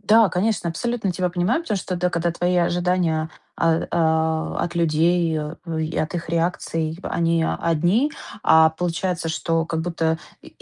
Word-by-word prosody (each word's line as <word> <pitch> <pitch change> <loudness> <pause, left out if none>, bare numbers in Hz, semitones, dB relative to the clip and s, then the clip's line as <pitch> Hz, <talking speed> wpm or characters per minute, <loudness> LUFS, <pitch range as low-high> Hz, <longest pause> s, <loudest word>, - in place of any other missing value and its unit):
Да, 215 +1 +5
конечно, 185 0 0
абсолютно 215 +3 -2
тебя 180 +1 -1
понимаю, 185 - 0
потому 215 - -2
что 190 - -5
тогда, 180 0 0
когда 170 0 0
твои 175 +1 0
ожидания, 175 -2 +1 0.3
а, 165 -1 +2
о 160 -1 +1
от 175 - -5
людей, 165 0 +2
э, 160 +2 -5
и 160 +1 -3
от 155 - -1
их 165 - -6
реакций, 165 -1 -1
они 165 -1 +1
одни, 175 - +1 0.3
а 160 0 +6
получается, 175 +1 -2
что 165 0 0
как 160 -1 -2
будто 160 -1 -1 0.2
и, - - -12
170 Hz, 160 wpm, -22 LUFS, 160-180 Hz, 0.3 s, а